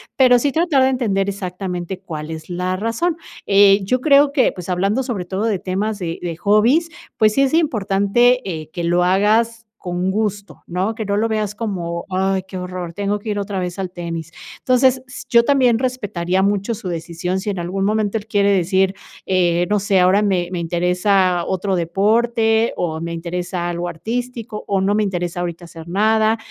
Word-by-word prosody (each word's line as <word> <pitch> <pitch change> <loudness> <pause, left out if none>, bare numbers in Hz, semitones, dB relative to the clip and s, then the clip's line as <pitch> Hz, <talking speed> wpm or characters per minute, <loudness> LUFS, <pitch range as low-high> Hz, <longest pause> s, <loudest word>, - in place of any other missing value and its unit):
Pero 250 -2 +5
sí 280 +2 0
tratar 325 -4 +2
de 260 - +4
entender 210 -7 0
exactamente 185 -2 -4
cuál 155 -4 -7
es 160 +2 -8
la 180 +1 -2
razón. 230 - -1 0.3
Eh, 200 0 +5
yo 255 +6 0
creo 280 +1 +5
que, 280 -2 +2
pues 180 -1 -8
hablando 195 +8 0
sobre 225 -8 -4
todo 190 +3 -3
de 215 -5 0
temas 200 +3 -2
de 170 -2 -4
de 170 -2 -4
hobbies, 225 - +3 0.3
pues 215 -2 +4
sí 275 - +2
es 275 +1 +2
importante, 240 - +2
eh, 155 -3 -5
que 170 -1 -4
lo 175 +1 +2
hagas 220 +5 +2 0.2
con 180 +1 -2
gusto, 205 -1 -3
¿no? 185 +5 -1
Que 220 -1 -5
no 200 0 -1
lo 220 +2 +1
veas 215 -2 -2
como: 175 -6 -3
"Ay 190 +1 0
qué 190 -1 -8
horror, 180 -1 -5
tengo 205 +2 -1
que 215 - -7
ir 205 -1 -1
otra 200 -1 -3
vez 180 +1 -4
al 185 -2 -3
tenis". 170 -2 -6 0.2
Entonces, 255 0 +2
s 250 - -9
yo 235 -1 +5
también 255 -5 +3
respetaría 190 -8 -1
mucho 205 +3 0
su 200 -4 -6
decisión 170 +2 -3
si 210 +2 -4
en 195 -3 -3
algún 190 +3 -2
momento 215 0 0
él 210 0 -8
quiere 200 -1 +2
decir: 190 0 +2 0.3
"Eh, 175 -2 +2
no 210 0 +2
sé, 195 -1 +2
ahora 185 +3 +4
me 185 -4 0
me 180 - -3
interesa 180 +1 +1
otro 190 0 -1
deporte 220 +6 +2
o 160 -2 -2
me 170 0 -4
interesa 175 +1 -3
algo 175 0 -3
artístico 230 +4 -5
o 195 -1 +1
no 200 +2 +1
me 215 - +2
interesa 175 -3 -3
ahorita 175 0 -4
hacer 165 -1 -11
nada". 220 +4 +2
195 Hz, 190 wpm, -19 LUFS, 180-220 Hz, 0.3 s, Pero